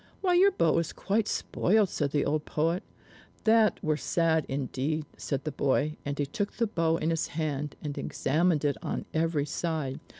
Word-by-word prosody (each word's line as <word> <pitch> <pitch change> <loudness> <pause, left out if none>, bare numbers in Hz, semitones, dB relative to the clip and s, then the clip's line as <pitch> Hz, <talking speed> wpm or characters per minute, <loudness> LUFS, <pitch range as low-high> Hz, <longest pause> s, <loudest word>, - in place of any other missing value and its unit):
"Why, 365 -2 +2
your 370 +3 +6
bow 170 - +2
is 165 -1 -3
quite 210 +2 0
spoiled," 205 +1 +2
said 145 -4 -1
the 145 +1 0
old 150 +1 0
poet. 165 +5 0 0.6
"That 220 -1 +4
were 155 -1 +1
sad 160 -1 +1
indeed," 140 +3 -2
said 140 -2 -3
the 155 - -3
boy, 145 +2 +1
and 145 0 -3
he 145 - 0
took 200 +8 -3
the 235 - +1
bow 165 -6 +1
in 160 +1 0
his 165 - 0
hand 150 -2 -2
and 145 -2 -4
examined 155 +2 +1
it 145 - +1
on - - -3
every 160 -2 +1
side. 155 -3 -2
155 Hz, 180 wpm, -29 LUFS, 145-175 Hz, 0.6 s, your